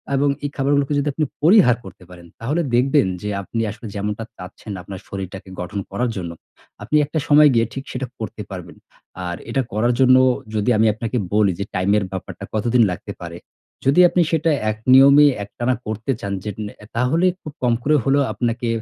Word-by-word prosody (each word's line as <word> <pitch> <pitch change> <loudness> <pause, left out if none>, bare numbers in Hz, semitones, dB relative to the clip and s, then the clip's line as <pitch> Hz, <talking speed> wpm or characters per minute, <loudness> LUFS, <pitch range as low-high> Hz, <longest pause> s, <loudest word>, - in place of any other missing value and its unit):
এবং 140 +1 +2 0.2
এই - - -1
খাবারগুলোকে 140 +1 +1
যদি 145 - -2
আপনি 155 +2 0 0.2
পরিহার 170 - +6
করতে 95 - -12
পারেন। 85 -1 -13
তাহলে 145 +9 -1
দেখবেন 135 -2 +3
যে, 105 - -4
আপনি 115 +4 -4
আসলে 110 +2 -10
যেমনটা 105 +2 -3
চাচ্ছেন 95 +4 -10
আপনার 95 +1 -8
শরীরটাকে 95 -1 -7
গঠন 90 +3 -4
করার 125 0 -1
জন্য। 85 -3 -4 0.5
আপনি 120 +8 -2
একটা 155 +2 -2
সময় 150 0 +7
গিয়ে 115 -1 +3
ঠিক 135 - -5
সেটা 130 0 -4
করতে 110 0 -6
পারবেন। 95 -3 -8 0.5
আর 90 - -3
এটা 135 +3 +1
করার 120 +4 +2
জন্য 130 -1 +6 0.4
যদি 105 +3 0
আমি 110 +1 +4
আপনাকে 115 +3 -3 0.2
বলি 105 -2 +3
যে 100 - -2
টাইমের 100 +3 +2
ব্যাপারটা 95 -1 -7
কতদিন 115 +2 +3
লাগতে 90 - -6
পারে। - - -7 0.5
যদি 140 +6 +4
আপনি 180 - +2
সেটা 165 0 +2 0.2
এক 110 - -7 0.2
নিয়মে 140 +2 +8 0.2
একটানা 120 +5 -2
করতে 110 +4 -3
চান, 100 0 -3
যেট 105 -3 -5
নে 105 - -7
অ্যা 105 - -15
তাহলে 140 +9 +2 0.2
খুব 155 - -9
কম 120 -1 +3
করে 150 +2 +3
হলেও 140 +2 +3
আপনাকে 120 0 -2
115 Hz, 190 wpm, -21 LUFS, 105-140 Hz, 0.5 s, নিয়মে